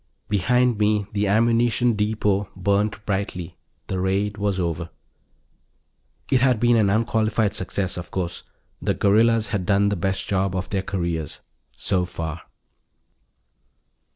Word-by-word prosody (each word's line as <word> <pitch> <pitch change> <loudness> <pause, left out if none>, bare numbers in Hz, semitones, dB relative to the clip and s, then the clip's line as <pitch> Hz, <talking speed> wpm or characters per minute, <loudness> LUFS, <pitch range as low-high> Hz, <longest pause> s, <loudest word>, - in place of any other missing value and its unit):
Behind 125 +3 +2
me 105 -1 +2
the 105 0 0
ammunition 115 +3 +3
depot 105 -2 0
burned 100 +3 +1
brightly. 95 -4 -3 0.3
The 95 - -3
raid 100 +2 0
was 100 -2 0
over. 85 -1 -2 1.4
It 130 - +4
had 125 -4 +3
been 120 +1 +4
an 105 -3 +3
unqualified 110 -1 +1
success, 95 -1 -2
of 90 - -6
course. 90 -2 -3 0.4
The - - 0
guerrillas 110 +1 +3
had 100 -3 -1
done 100 0 +3
the 100 - 0
best 95 +2 -2
job 95 -1 0
of 95 - -3
their 100 -2 0
careers. 85 -5 -3 0.3
So 90 -2 0
far. 85 -1 -5
100 Hz, 130 wpm, -23 LUFS, 95-110 Hz, 1.4 s, It